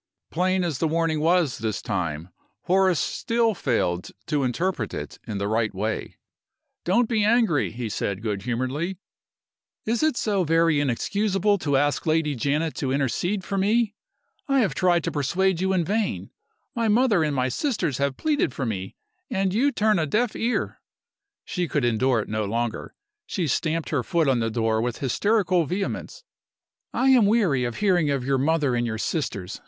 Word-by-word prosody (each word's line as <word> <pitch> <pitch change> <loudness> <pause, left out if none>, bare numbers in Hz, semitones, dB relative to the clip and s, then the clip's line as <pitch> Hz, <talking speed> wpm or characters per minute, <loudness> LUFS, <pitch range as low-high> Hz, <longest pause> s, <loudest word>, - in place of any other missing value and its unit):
Plain 185 +2 +1
as 160 -7 -2
the 165 - +1
warning 160 -1 0
was 165 -3 +2
this 110 -2 -2
time, 85 -4 -3 0.3
Horace 185 -3 +3
still 230 - 0
failed 115 - -1 0.2
to 145 -2 0
interpret 130 - -1
it - - -7
in 105 - -3
the 100 0 -2
right 110 0 0
way. 110 +3 -3 0.7
"Don't 230 +7 +2
be 220 -3 +1
angry!" 220 - +3
he 120 0 -4
said, 100 -1 -3
good 105 -3 -2
humoredly. 130 - -2 0.9
"Is 230 +1 0
it 310 -5 +2
so 200 -4 +1
very 165 -1 +3
inexcusable 200 - +1
to 145 -4 +1
ask 145 +3 0
Lady 155 -1 +2
Janet 145 +5 -1
to 135 -3 -1
intercede 145 - -1
for 195 0 -2
me? 215 +2 +2 0.5
I 275 -2 +3
have 210 - +1
tried 175 -3 +2
to - - -2
persuade 175 +5 0
you 190 0 +1
in 180 -3 +1
vain. 210 +2 -2 0.4
My 230 -1 0
mother 215 -5 +3
and 150 -2 -1
my 130 -1 +1
sisters 175 - -1
have 140 -1 0
pleaded 290 - 0
for 135 - -2
me, 95 -4 -4 0.3
and 190 -1 0
you 265 +7 +2
turn 215 -5 +2
a 155 - 0
deaf 220 - 0
ear 235 +2 -2 0.3
" 405 0 -64
She 180 -2 -2
could 145 -5 0
endure 120 +1 +2
it - - -7
no 110 0 -2
longer. 115 +2 -3 0.3
She 180 - -2
stamped 160 +3 -1
her 145 -5 0
foot 160 +5 0
on 130 -3 +3
the 115 -1 0
door 110 -1 0
with 120 0 -2
hysterical 180 - +1
vehemence. 195 - -4 0.7
"I 265 - +2
am 245 -6 +6
weary 185 - +2
of 120 - -3
hearing 180 -7 +2
of 135 -3 -1
your 135 0 +1
mother 145 -2 +1
and 120 0 0
your 110 -1 -3
sisters!" 105 - -3
160 Hz, 180 wpm, -24 LUFS, 125-195 Hz, 0.9 s, am